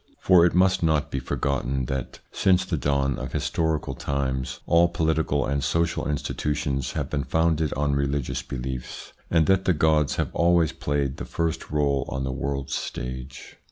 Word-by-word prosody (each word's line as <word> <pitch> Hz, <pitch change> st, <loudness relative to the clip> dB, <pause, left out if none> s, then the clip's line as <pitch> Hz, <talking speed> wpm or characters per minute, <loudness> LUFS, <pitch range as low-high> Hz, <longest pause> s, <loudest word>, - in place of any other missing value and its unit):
For 90 Hz, -2 st, +5 dB
it 85 Hz, -, -2 dB
must 95 Hz, +1 st, +4 dB
not 80 Hz, -3 st, +1 dB
be 65 Hz, -, -1 dB
forgotten 65 Hz, 0 st, -1 dB
that, 65 Hz, 0 st, -4 dB
since 95 Hz, -1 st, +3 dB
the 85 Hz, -, -1 dB
dawn 70 Hz, -1 st, 0 dB
of 65 Hz, -1 st, -6 dB
historical 80 Hz, -2 st, -1 dB
times, 65 Hz, -2 st, -2 dB
all 85 Hz, +1 st, +5 dB
political 80 Hz, -4 st, 0 dB
and 70 Hz, 0 st, -1 dB
social 85 Hz, 0 st, 0 dB
institutions 70 Hz, -2 st, -2 dB
have -, -, -2 dB
been 70 Hz, -2 st, -2 dB
founded 80 Hz, 0 st, +1 dB
on 70 Hz, 0 st, 0 dB
religious 70 Hz, -1 st, -1 dB
beliefs, 65 Hz, -1 st, -6 dB, 0.2 s
and 80 Hz, -2 st, +3 dB
that 95 Hz, +1 st, +3 dB
the 90 Hz, -, +4 dB
gods 75 Hz, -2 st, +2 dB
have -, -, -2 dB
always 85 Hz, -1 st, +3 dB
played 70 Hz, -2 st, -2 dB
the -, -, -5 dB
first 85 Hz, -2 st, -2 dB
role 70 Hz, -2 st, +1 dB
on 65 Hz, -1 st, -3 dB
the 65 Hz, -, -2 dB
world's 70 Hz, 0 st, -3 dB
stage. 65 Hz, +1 st, -6 dB
70 Hz, 165 wpm, -25 LUFS, 65-80 Hz, 0.2 s, For